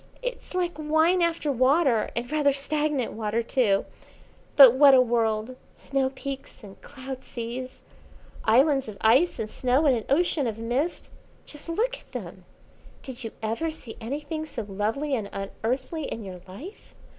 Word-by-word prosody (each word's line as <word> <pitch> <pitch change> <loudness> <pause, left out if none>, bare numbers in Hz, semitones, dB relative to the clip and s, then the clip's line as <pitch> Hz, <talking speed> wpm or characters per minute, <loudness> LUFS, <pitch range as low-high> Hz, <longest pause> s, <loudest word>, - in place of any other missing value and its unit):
It's - - -5
like 350 -4 -1
wine 315 +4 +3
after 335 -3 +1
water, 260 -2 +3
and 240 +3 -3
rather 295 -2 +3
stagnant 290 -2 -1
water 220 +1 -1
too. 225 -5 +1 0.7
But 265 -5 +10
what 275 0 +7
a - - +7
world, 230 -1 +1 0.2
snow 270 -1 -1
peaks 270 -2 -8
and 195 -2 -13
cloud 265 -2 -8
seas, 245 +2 -7 0.6
islands 270 +4 +3
of 210 -2 -8
ice 260 +11 +4
and 215 - -3
snow 255 +6 +1
in 280 - +5
an 225 - -4
ocean 295 -2 +2
of 220 -1 -3
mist! 245 +9 -2 0.3
Just 295 +2 -11
look 485 +9 -1
at - - -24
them! - - -7 0.6
Did 260 -1 -7
you 225 - -4
ever 230 +10 -1
see 265 -7 -9
anything 295 +6 -4
so 230 -7 -5
lovely 220 +9 -2
and 215 -6 -2
unearthly 255 - -3
in 225 - -5
your 185 -2 -8
life? 285 - -11
265 Hz, 155 wpm, -26 LUFS, 230-300 Hz, 0.7 s, But